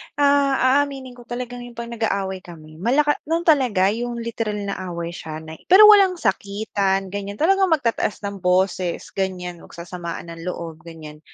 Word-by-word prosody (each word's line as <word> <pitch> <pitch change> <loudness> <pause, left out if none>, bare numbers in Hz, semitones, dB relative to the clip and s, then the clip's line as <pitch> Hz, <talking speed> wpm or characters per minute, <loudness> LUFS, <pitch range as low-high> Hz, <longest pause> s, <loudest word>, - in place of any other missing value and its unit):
ah, 280 -2 +3
aaminin 275 -3 -3
ko 245 -1 -15
talagang 245 0 -5
yung 240 - -13
'pag 235 0 -6
nag-aaway 195 -5 -2
kami, 155 -3 -13
malaka 290 - +2
no'n 330 +1 0
talaga, 245 - +3
yung 240 +2 -3
literal 230 -2 -3
na 200 -1 -4
away 170 -1 -4
siya 160 -2 -7
na 160 0 -10
pero 380 +4 +8
walang 390 -3 +6
sakitan, 200 - -1
ganyan. 200 0 -5
Talagang 385 - +3
magtataas 245 - 0
ng 200 -1 -5
boses, 180 -1 0
ganyan. 180 -2 -3
Magsasamaan 170 -1 -8
ng 165 +1 -9
loob, 165 -3 -5
ganyan. 155 -2 -10
200 Hz, 160 wpm, -22 LUFS, 180-255 Hz, -, pero